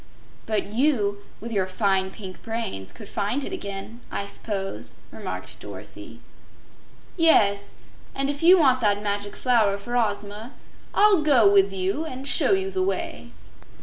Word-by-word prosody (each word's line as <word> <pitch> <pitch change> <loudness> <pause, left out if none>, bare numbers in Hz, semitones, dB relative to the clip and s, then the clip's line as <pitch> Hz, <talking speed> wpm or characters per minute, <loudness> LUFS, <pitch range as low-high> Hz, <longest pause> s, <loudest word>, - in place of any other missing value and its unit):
"But 215 -2 0
you, 225 -6 +1 0.2
with 230 +2 -7
your 195 -4 0
fine 190 0 0
pink 190 -1 -9
brains, 220 - -4
could 200 - -11
find 215 +7 -2
it 380 - -5
again, 205 - -6
I 200 - -3
s'pose," 200 -1 -5
remarked - - -7
Dorothy. - - -11 1.0
"Yes; 205 - +3 0.4
and 275 0 0
if 285 0 -3
you 355 +3 +7
want 260 -6 +4
that 205 -2 +2
Magic 205 0 -2
Flower 225 -6 +2
for 240 +5 -6
Ozma, 210 +1 -2 0.4
I'll 410 -4 +5
go 270 -8 +5
with 195 0 +5
you 195 +10 -1
and 270 -3 -6
show 390 - +5
you 385 0 0
the 375 - -1
way." 375 - -3
215 Hz, 150 wpm, -24 LUFS, 200-275 Hz, 1.0 s, you